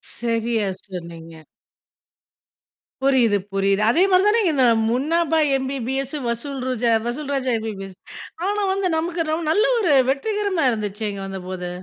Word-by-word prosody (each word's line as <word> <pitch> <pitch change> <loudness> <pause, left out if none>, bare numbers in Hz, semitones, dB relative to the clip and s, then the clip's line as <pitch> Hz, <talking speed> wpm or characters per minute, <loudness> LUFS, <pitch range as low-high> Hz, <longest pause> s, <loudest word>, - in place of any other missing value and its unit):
சரியா 230 -2 -1 0.2
சொன்னீங்க. 165 -3 -9 1.6
புரியுது, 245 -6 +3 0.2
புரியுது. 195 +1 +1
அதே 325 +9 +3
மாதிரி 370 +1 +5
தானே 450 +2 +4
இங்க 350 - +2
இந்த 260 -2 +4 0.2
முன்னாபா 320 +5 +1 0.2
எம்பிபிஎஸ், 265 +1 -3
வசூல் 265 +4 -3
ராஜா 245 -2 0
வசூல் 280 +4 -4
ராஜா 260 -1 -1
எம்பிபிஎஸ். 195 -4 -6 0.5
ஆனா, 415 0 0
வந்து 385 -1 0
நமக்கு 330 0 -2
ரொம்ப 320 0 -2
நல்ல 415 +7 +3
ஒரு 350 -9 +2 0.2
வெற்றிகரமா 395 +3 0
இருந்துச்சேங்க 210 -2 -4
வந்தபோது. 185 -2 -6
255 Hz, 125 wpm, -22 LUFS, 205-320 Hz, 1.6 s, மாதிரி